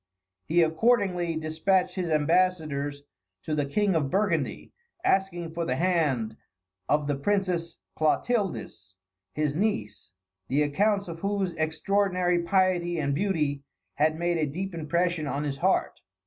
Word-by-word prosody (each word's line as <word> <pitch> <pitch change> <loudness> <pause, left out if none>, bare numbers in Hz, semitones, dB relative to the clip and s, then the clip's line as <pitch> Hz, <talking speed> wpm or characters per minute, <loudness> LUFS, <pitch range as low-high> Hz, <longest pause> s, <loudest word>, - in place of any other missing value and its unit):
He 170 +2 +4
accordingly 180 -1 +2
despatched 180 +4 +1
his 180 -3 -2
ambassadors 155 -3 +1 0.4
to 155 - -3
the 145 -2 0
King 200 +7 +1
of 150 -5 +1
Burgundy, 185 -5 -1 0.3
asking 190 - 0
for 170 +1 -3
the 130 -6 -1
hand 140 -10 0 0.5
of 150 0 +2
the 145 - 0
Princess 175 +1 -1 0.2
Clotildis, 155 - -1 0.4
his 150 -1 0
niece, 105 - -2 0.4
the 145 +4 +2
accounts 200 +7 +1
of 165 -1 -7
whose 195 -1 -1
extraordinary 180 +2 +1
piety 175 -1 +1
and 140 -2 0
beauty 150 -5 0 0.3
had 155 +5 +1
made 175 0 0
a 155 - +1
deep 190 +4 -4
impression 170 0 -1
on 145 +1 -2
his 140 -2 -3
heart. - - +1
170 Hz, 135 wpm, -27 LUFS, 150-185 Hz, 0.5 s, He